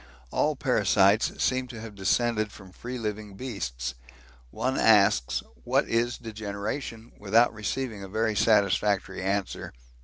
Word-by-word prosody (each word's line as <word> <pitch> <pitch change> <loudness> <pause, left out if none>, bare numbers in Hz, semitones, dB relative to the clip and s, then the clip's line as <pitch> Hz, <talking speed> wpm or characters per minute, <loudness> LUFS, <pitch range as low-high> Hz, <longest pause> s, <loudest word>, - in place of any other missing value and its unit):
All 150 0 +1
parasites 105 -5 +3
seem 130 0 +1
to 120 -3 -9
have 110 -1 -8
descended 110 +3 +1
from 95 -3 -13
free 125 +6 -6
living 105 -3 -5
beasts. 65 - -4 0.6
One 130 - -1
asks 100 - +4 0.2
'what - - +2
is 120 +1 0
degeneration?' 110 +2 -5
without 110 +4 +3
receiving 110 0 -3
a 95 - -8
very 110 +2 0
satisfactory 100 -2 +2
answer. 95 +1 -2
105 Hz, 125 wpm, -27 LUFS, 100-115 Hz, 0.6 s, asks